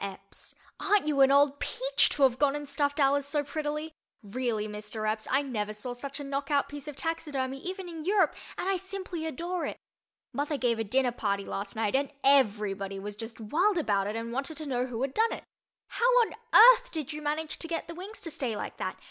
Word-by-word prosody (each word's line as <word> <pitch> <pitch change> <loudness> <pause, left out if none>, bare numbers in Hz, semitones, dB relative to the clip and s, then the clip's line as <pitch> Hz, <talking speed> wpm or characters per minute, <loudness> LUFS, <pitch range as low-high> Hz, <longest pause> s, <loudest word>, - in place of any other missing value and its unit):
Epps: 195 0 -8 0.2
Aren't 400 -3 +3
you 295 -2 +2
an 270 - +7
old 285 0 +4
peach - - +2
to 285 - 0
have 255 -2 +4
gone 285 -1 +3
and 295 0 -5
stuffed 285 +1 0
Alice 280 0 +4
so 290 0 0
prettily! 300 +1 -3 0.3
Really, 220 0 -2
Mr. 210 +1 -4
Epps, 215 0 -1
I 275 +2 +3
never 215 -6 -3
saw 230 +4 -5
such 275 +4 -6
a - - -5
knockout 280 +1 0
piece 290 0 -8
of 295 - -6
taxidermy, 275 -5 -2
even 370 +3 -5
in 325 -2 -7
Europe, 385 -2 +3 0.2
and - - -3
I 390 -1 +2
simply 370 -3 -5
adore 340 +4 -3
it. - - -5 0.6
Mother 290 +1 -1
gave 235 -3 +1
a - - +1
dinner 250 +4 +2
party 200 -4 -1
last 200 0 -5
night 220 +1 0
and 275 0 +1
everybody 205 -7 +3
was 205 +1 -6
just 225 +2 -8
wild 350 - +2
about 200 -10 +1
it 210 - -3
and 230 +1 -4
wanted 275 +5 -3
to 310 - -5
know 250 -2 0
who 245 0 -3
had 270 -1 -2
done 450 +1 +2
it. - - -7 0.5
How 485 - +2
on 460 - 0 0.2
earth - - +9
did 310 -2 -4
you 300 - -6
manage 305 +1 -2
to 330 - -4
get 330 -1 -3
the 335 - -6
wings 385 +6 -9
to 330 - -3
stay 255 -7 -2
like - - -5
that? - - -3
280 Hz, 220 wpm, -29 LUFS, 230-320 Hz, 0.6 s, earth